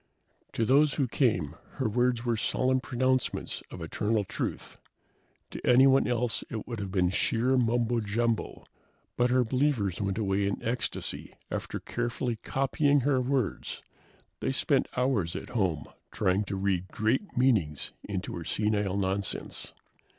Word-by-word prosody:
To 115 - +1
those 145 +5 +4
who 140 -4 +1
came, 90 - +1 0.2
her 130 -4 -1
words 120 +2 +1
were 120 -1 +2
solemn 130 +3 +1
pronouncements 130 0 -1
of 90 - -7
eternal 105 +6 0
truth. - - -5 0.7
To - - -7
anyone 135 +2 +6
else 120 -1 0
it 110 -3 -5
would 115 -3 -4
have 100 -2 -4
been 90 -2 +2
sheer 120 +6 +2
mumbo 120 -1 +2
jumbo, 115 +2 -1 0.5
but 125 0 +2
her 125 0 +4
believers 120 - 0
went 100 0 -1
away 100 -2 +1
in 100 - -1
ecstasy 120 +2 -3 0.2
after - - -3
carefully 120 0 -2
copying 140 +3 +1
her 135 0 +2
words. 130 -3 -2 0.6
They - - -1
spent - - +2
hours 125 -10 +1
at - - -6
home 95 -10 0 0.2
trying 95 +3 +1
to 100 - -3
read 95 -2 0
great 110 - -1
meanings 105 - +2
into 100 -1 -4
her 85 - -5
senile 105 0 0
nonsense. 100 0 -2
115 Hz, 145 wpm, -29 LUFS, 100-125 Hz, 0.7 s, anyone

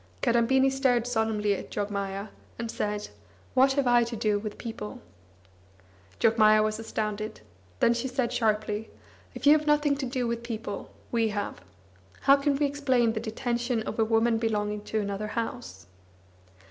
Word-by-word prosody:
Kadambini 260 +2 +3
stared 260 -3 +2
solemnly 220 -3 +1
at 195 - -6
Jogmaya, 200 0 -3 0.3
and 230 -1 -4
said: 210 -2 -3 0.4
"What 270 +1 +5
have 280 -1 +1
I 240 -1 +5
to 235 0 -5
do 210 -1 +1
with 210 0 -6
people?" 230 +1 -6 1.2
Jogmaya 215 -1 +5
was 215 0 -1
astounded. 215 - -4 0.4
Then 235 - +5
she 235 +2 -2
said 250 -1 -1
sharply: 215 -1 0 0.5
"If - - -6
you 290 - +8
have 305 0 -1
nothing 295 -1 +3
to 270 -2 -3
do 250 0 -1
with 235 0 -2
people, 225 -3 -5 0.2
we 230 -2 +2
have. 205 - -4 0.6
How 275 - +7
can 280 0 +1
we 290 +1 +1
explain 260 -5 +1
the 220 - -2
detention 235 +1 -2
of - - -5
a - - +5
woman 225 +1 +2
belonging 210 -2 -1
to 220 - -1
another 200 0 -3
house?" 95 - -5
225 Hz, 160 wpm, -27 LUFS, 215-250 Hz, 1.2 s, you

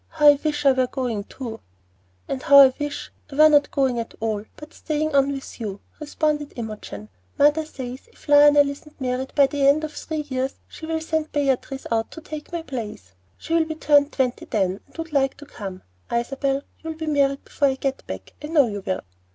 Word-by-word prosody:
"How 300 -2 +6
I 290 -1 +5
wish 295 -2 -1
I 275 - +8
were 260 -1 +2
going 240 -6 -3
too." 230 -3 -7 0.7
"And 260 - -3
how 280 - +6
I 265 -2 +7
wish 290 0 -4 0.2
I - - -7
were 310 +1 +7
not 290 -1 +4
going 265 -3 +1
at 230 - -6
all, 215 -2 -1
but 300 +2 -12
staying 310 0 -2
on 275 0 +4
with 275 -2 -7
you," 205 -3 -4 0.2
responded 300 -1 -1
Imogen. 215 - -7 0.3
"Mother 295 +2 +4
says 260 - -8
if - - -21
Lionel 290 0 +7
isn't 285 +2 -9
married 260 0 -2
by 280 - +6
the 275 0 +1
end 295 +3 +4
of 305 -1 -4
three 310 0 -4
years 260 0 -2
she'll 320 0 -4
send 315 -1 -2
Beatrice 270 -2 -1
out 225 -1 0
to 325 - -10
take 305 0 -8
my 340 -1 -3
place. 210 - -7 0.2
She'll 330 0 +1
be 315 0 -5
turned 290 -2 +4
twenty 255 -3 -1
then, 195 -3 0
and - - -20
would 325 -1 -6
like 270 -1 +1
to 290 - -11
come. 195 -9 -8 0.3
Isabel, 270 +3 -1 0.2
you'll 320 0 -6
be 320 0 -5
married 280 -2 +1
before 285 - +1
I 265 - +1
get 270 0 -3
back, - - -7
I - - -4
know 305 -4 +4
you 205 -2 -4
will." 185 0 -2
280 Hz, 205 wpm, -23 LUFS, 255-300 Hz, 0.7 s, I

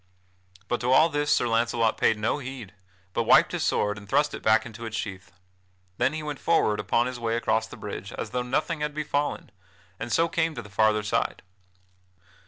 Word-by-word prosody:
But 120 - -1
to 125 +1 +1
all 155 +5 +6
this 145 -1 -1
Sir 120 - +3
Launcelot 115 0 +1
paid 110 - +2
no 105 +7 0
heed, 125 -7 -8 0.4
but - - +1
wiped - - +5
his - - -2
sword 105 0 0
and 100 -1 -15
thrust 150 +6 +2
it - - -6
back 110 +1 +3
into 115 0 -7
its 115 0 -4
sheath. 95 -3 -6 0.7
Then - - +3
he 155 0 -4
went 150 -2 -5
forward 110 -11 +2
upon 115 +3 +1
his 125 -1 -5
way 115 -1 -1
across 110 -1 0
the - - -11
bridge - - -7
as - - -5
though 125 - -1
nothing 150 +6 -1
had 150 0 -2
befallen, 145 -6 -2 0.5
and 120 - -5
so 165 - +3
came 165 -1 -1
to 120 - -6
the 105 - -14
farther 105 0 +2
side. 105 - -1
120 Hz, 200 wpm, -26 LUFS, 110-145 Hz, 0.7 s, all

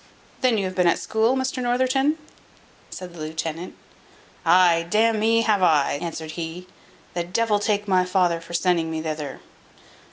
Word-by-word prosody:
"Then 250 -3 +3
you 200 - 0
have 185 - -4
been 180 -1 +2
at 170 - +3
school, 225 +3 +1
Mr 260 0 -2
Northerton?" 260 +4 +1 0.7
said 180 -2 -8
the 170 - -12
lieutenant. 160 +2 -5 0.7
"Ay, 170 -1 +4
d 210 - +1
n 225 0 +3
me, 225 +1 +3
have 210 -3 +2
I," 150 -5 +3
answered 160 -2 -5
he; 170 +2 -6 0.5
"the 175 - -1
devil 210 +4 0
take 205 0 -1
my 185 -2 +3
father 180 -2 +1
for 170 +1 -7
sending 170 -2 +1
me 160 -1 -4
thither! 150 -3 -5
180 Hz, 165 wpm, -23 LUFS, 165-220 Hz, 0.7 s, Ay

